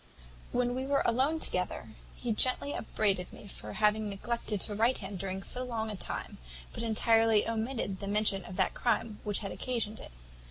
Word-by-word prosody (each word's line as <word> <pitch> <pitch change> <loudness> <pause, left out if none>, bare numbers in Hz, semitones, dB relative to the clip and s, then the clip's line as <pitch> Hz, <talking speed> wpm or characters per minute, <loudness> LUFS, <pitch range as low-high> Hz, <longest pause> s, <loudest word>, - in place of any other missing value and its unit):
"When 245 0 +1
we 260 +1 -2
were 280 0 +3
alone 270 +7 +3
together, 180 - -1 0.3
he 240 -2 -1
gently 255 +5 +2
upbraided 195 -5 0
me - - -11
with 200 - -8
having 215 0 +3
neglected 210 +1 -2
to 210 - -1
write 230 +5 +3
to - - -6
him 195 0 -5
during 190 +1 -3
so 250 - -4
long 225 -3 -2
a - - -4
time, - - -5 0.3
but - - -4
entirely 225 -1 +4
omitted 225 -3 -1
the 200 - -5
mention 205 -2 +2
of 180 - -7
that - - +2
crime 225 -2 0
which 205 -1 0
had 195 - -3
occasioned 225 -4 -2
it. - - -9
220 Hz, 190 wpm, -31 LUFS, 200-240 Hz, 0.3 s, entirely